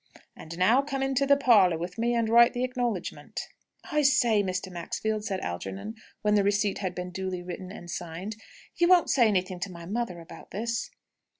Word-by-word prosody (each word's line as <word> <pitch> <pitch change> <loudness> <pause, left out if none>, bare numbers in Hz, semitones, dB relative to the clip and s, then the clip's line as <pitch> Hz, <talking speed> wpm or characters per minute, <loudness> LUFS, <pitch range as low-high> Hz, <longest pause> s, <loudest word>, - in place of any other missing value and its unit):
"And 165 +1 -9
now 225 +9 +4
come 275 -1 -3
into 270 +1 +1
the 280 0 +6
parlour 210 - +5
with 175 +5 -6
me, 240 +1 +1
and 230 -1 +1
write 235 +1 +6
the 245 - -2
acknowledgment." 245 -6 -3 0.4
"I 300 - +2
say, 240 -6 +4
Mr. 185 -1 -3
Maxfield," 210 +5 -3
said 190 -3 -2
Algernon, 95 - -5 0.3
when 210 0 +3
the 205 -1 +4
receipt 205 0 +1
had 185 -3 -3
been 180 0 -5
duly 185 -1 -4
written 180 +1 -7
and 175 -4 -10
signed, 175 +4 -5 0.4
"you 345 - +4
won't 360 -2 +5
say 245 -4 +5
anything 185 -3 0
to 185 +1 -4
my 170 -1 -9
mother 200 -2 -3
about 165 0 -12
this?" 230 +3 -3
205 Hz, 190 wpm, -27 LUFS, 180-235 Hz, 0.4 s, the